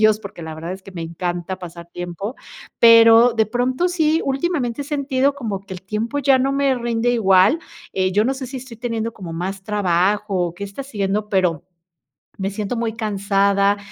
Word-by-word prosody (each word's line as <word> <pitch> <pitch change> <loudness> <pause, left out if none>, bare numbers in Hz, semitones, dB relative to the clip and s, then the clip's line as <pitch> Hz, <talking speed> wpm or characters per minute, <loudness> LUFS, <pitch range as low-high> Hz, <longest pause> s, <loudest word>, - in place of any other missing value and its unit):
ellos, 215 0 +4
porque 195 -4 -9
la 160 0 -6
verdad 165 +3 -6
es 190 0 -9
que 195 - -11
me 170 -2 -5
encanta 175 +2 -4
pasar 170 -1 -9
tiempo, 175 +7 -6 0.4
pero 230 +1 +7
de 220 -1 +2
pronto 255 +9 0
sí, 320 -2 +2
últimamente 275 -3 -1
he - - -10
sentido 280 -1 0
como 225 -8 -4
que 190 - -7
el 180 - -10
tiempo 220 +8 -2
ya 270 -1 +4
no 270 +1 +1
me 275 -1 +2
rinde 235 0 0
igual, 200 - +4 0.3
eh, 185 0 0
yo 210 +3 +3
no 265 - +1
sé 265 -1 -6
si 260 +1 -6
estoy 250 -2 -11
teniendo 230 -1 -3
como 180 -5 -8
más 190 +4 -4
trabajo 200 +1 +1
o 170 - -10
qué 180 - -9
está 200 +7 -7
siendo, 210 -5 -2
pero 180 -6 +1 0.7
me 195 0 -2
siento 210 +3 -3
muy 230 -1 -1
cansada, 200 -2 +1
215 Hz, 195 wpm, -20 LUFS, 190-245 Hz, 0.7 s, pero